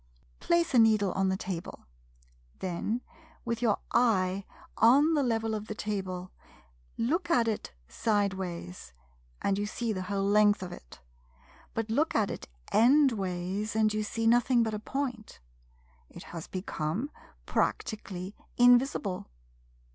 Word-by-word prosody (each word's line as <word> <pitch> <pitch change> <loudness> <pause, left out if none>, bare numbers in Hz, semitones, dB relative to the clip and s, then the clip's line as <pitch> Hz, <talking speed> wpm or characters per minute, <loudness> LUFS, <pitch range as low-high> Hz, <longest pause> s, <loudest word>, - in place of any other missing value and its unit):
Place 340 -3 +1
a 245 - +6
needle 215 -4 +4
on 190 0 +1
the 190 - 0
table. 180 -3 -6 0.7
Then, 190 +6 -2 0.4
with 235 0 -2
your 225 -4 +3
eye 200 -5 +2 0.3
on 285 +8 +5
the 300 - +3
level 225 -3 0
of 215 0 -4
the 215 - -5
table, 190 -4 -4 0.7
look 330 +10 0
at 240 -9 +3
it 220 -2 -2 0.2
side 205 - +1
ways, 170 - -7 0.5
and 195 0 +1
you 205 - -1
see 230 +1 -2
the 185 - -3
whole 195 +1 -2
length 205 -1 +4
of 180 - -6
it; - - -12 0.7
but 225 -1 -2
look 300 +8 +1
at 210 -3 +2
it - - -7 0.2
end 270 +5 +5
ways, 195 +1 -3
and 215 -1 +3
you 215 - 0
see 225 +2 -3
nothing 240 +1 +4
but 220 -1 -2
a 210 - -2
point, 250 -1 -4 0.7
it - - -11
has 165 -2 -6
become 185 - -3 0.3
practically 195 -3 -2 0.2
invisible. 245 -6 +3
215 Hz, 140 wpm, -29 LUFS, 190-235 Hz, 0.7 s, a